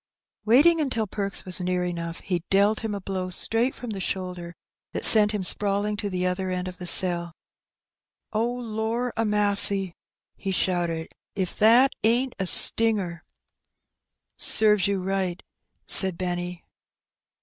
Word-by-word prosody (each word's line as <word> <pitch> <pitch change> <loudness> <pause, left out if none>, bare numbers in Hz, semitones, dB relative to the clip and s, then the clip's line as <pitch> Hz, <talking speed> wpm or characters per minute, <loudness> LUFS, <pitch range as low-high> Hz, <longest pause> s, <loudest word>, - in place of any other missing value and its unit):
Waiting 305 +9 +4
until 245 -7 -2
Perks 200 0 -6
was 185 0 0
near 180 0 -2
enough^ 170 -1 -6
he 180 -3 -3
dealt 200 +2 +2
him 220 -3 -5
a - - -5
blow 185 -1 -5
straight 225 +7 0
from 245 -2 -8
the 200 - -6
shoulder 180 -2 -6 0.4
that - - +3
sent 210 -2 +9
him 210 -2 -4
sprawling 205 +2 -1
to 205 -1 -4
the 180 -1 -3
other 185 +1 -3
end 180 0 -4
of 180 -1 -9
the 180 - -9
cell. 170 -2 +3 1.0
^'Oh^ 240 +3 -2
lor 225 +2 -4
a 225 - -1
massy 205 -2 +3
1'' - - -25 0.4
he 195 - -5
shouted^ 175 -3 -2 0.3
''if 190 -3 -4
that 235 +5 +4
ain't 240 +4 0
a 190 - -2
stinger!'' 195 -6 +2 0.7
" - - -55
Serves 210 -3 +2
you 200 -1 -2
right/' 190 -2 -3 0.4
said 190 -3 +6
Benny. 175 -1 -5
195 Hz, 150 wpm, -24 LUFS, 180-220 Hz, 1.0 s, sent